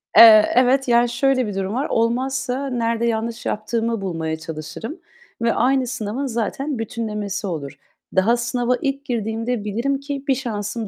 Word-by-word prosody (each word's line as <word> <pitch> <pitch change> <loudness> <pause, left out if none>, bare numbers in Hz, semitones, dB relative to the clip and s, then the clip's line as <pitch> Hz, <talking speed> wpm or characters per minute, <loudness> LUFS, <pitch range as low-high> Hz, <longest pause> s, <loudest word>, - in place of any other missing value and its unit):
Eee, 215 -2 +9
evet, 260 +2 +4
yani, 240 0 +4
şöyle 255 0 +1
bir 205 - -5
durum 195 +1 -2
var, 265 +5 -1
olmazsa 255 +3 0
nerede 230 -2 0
yanlış 230 0 -2
yaptığımı 225 +1 -1
bulmaya 165 -4 -3
çalışırım 165 - -7 0.4
ve 230 0 +2
aynı 260 0 +2
sınavın 230 +3 -3
zaten 255 +4 -2
bütünlemesi 210 -3 -3
olur. 150 -6 -4 0.4
Daha 215 +6 +4
sınava 240 +1 0
ilk 275 0 -2
girdiğimde 225 -1 -2
bilirim 235 +7 -1
ki 280 -1 -5
1 270 - +3
şansım 220 -3 -4
235 Hz, 150 wpm, -21 LUFS, 210-255 Hz, 0.4 s, Eee